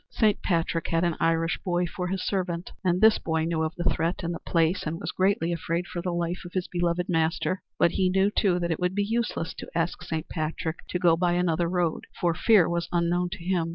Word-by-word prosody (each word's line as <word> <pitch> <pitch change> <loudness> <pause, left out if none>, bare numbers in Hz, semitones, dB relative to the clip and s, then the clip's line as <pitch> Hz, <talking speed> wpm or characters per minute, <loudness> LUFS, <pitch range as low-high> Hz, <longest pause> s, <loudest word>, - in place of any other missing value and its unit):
Saint 215 -3 +2
Patrick 165 -2 0
had 165 +1 +1
an 170 -2 +1
Irish 165 0 +1
boy 175 -1 +1
for 180 +1 -4
his 190 +1 -2
servant 180 -3 -2
and 180 -1 +1
this 220 0 +6
boy 160 -1 -1
knew 165 -1 -1
of 160 +2 -2
the 175 - -3
threat 170 +2 0
and 170 +1 -2
the 170 - -5
place 165 +2 +1
and 165 +2 -3
was - - -4
greatly 185 -3 +1
afraid 170 +1 -2
for 175 - -5
the 180 - -2
life 170 +1 -2
of 175 - -10
his 185 -1 -1
beloved 175 0 -1
master. 165 +2 0 0.2
But 170 - +4
he 185 -1 +1
knew, 195 +2 +2
too, 190 -4 +2
that 170 -1 -1
it 160 - -1
would 180 +1 0
be 205 - +2
useless 225 -7 -1
to - - -7
ask 170 +1 -1
Saint 165 -2 -4
Patrick 160 +1 -3
to - - -2
go 175 -2 +4
by 175 +1 +1
another 175 -1 +1
road, 175 -3 -1
for 175 -1 +2
fear 195 0 +5
was 170 0 -2
unknown 175 +1 +1
to 190 -3 -9
him. 175 -2 0
175 Hz, 235 wpm, -26 LUFS, 165-180 Hz, 0.2 s, this